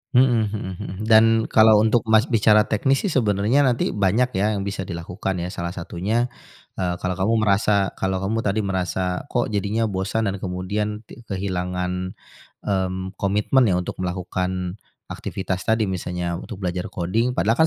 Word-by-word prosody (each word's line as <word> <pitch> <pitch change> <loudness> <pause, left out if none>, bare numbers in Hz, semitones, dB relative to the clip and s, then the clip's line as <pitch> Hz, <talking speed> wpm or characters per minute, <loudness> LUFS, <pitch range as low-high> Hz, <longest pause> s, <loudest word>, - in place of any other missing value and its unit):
Mhm, 125 - +8 0.2
heeh 100 -3 -5
heeh, - - -6
dan 115 0 +5
kalau 110 -1 +6
untuk, 110 +2 +4
Mas, 110 0 +5
bicara 105 -1 +5
teknis, 135 +7 +1
sih, 195 - 0
sebenarnya 105 0 +2
nanti 120 -2 +1
banyak, 105 +6 +2
ya, 105 +2 +1
yang 100 - -2
bisa 95 -2 -4
dilakukan, 90 +2 -4
ya. 90 - -4
Salah 85 0 -4
satunya, 105 +8 -1 0.5
eee, 90 -2 0
kalau 90 0 -1
kamu 110 +5 +2
merasa 100 -1 +2
kalau 95 0 -1
kamu 110 +3 0
tadi 105 -1 0
merasa, 95 +1 -2
kok, 120 -4 -1
jadinya 105 +2 0
bosan 100 +1 -1
dan 95 - -6
kemudian 105 +4 -3
tik 120 +1 -15
kehilangan, 90 -1 -3 0.5
mmm, 95 -1 -2
komitmen, 105 +6 +2
ya, 95 - +2
untuk 90 +1 -3
melakukan 90 +1 -3 0.3
aktivitas 95 -2 -4
tadi, 110 0 +3
misalnya 90 -1 -3
untuk 110 - -8
belajar 90 0 -2
coding 115 +9 -1
padahal, 115 +2 +1
100 Hz, 160 wpm, -23 LUFS, 90-110 Hz, 0.5 s, Mhm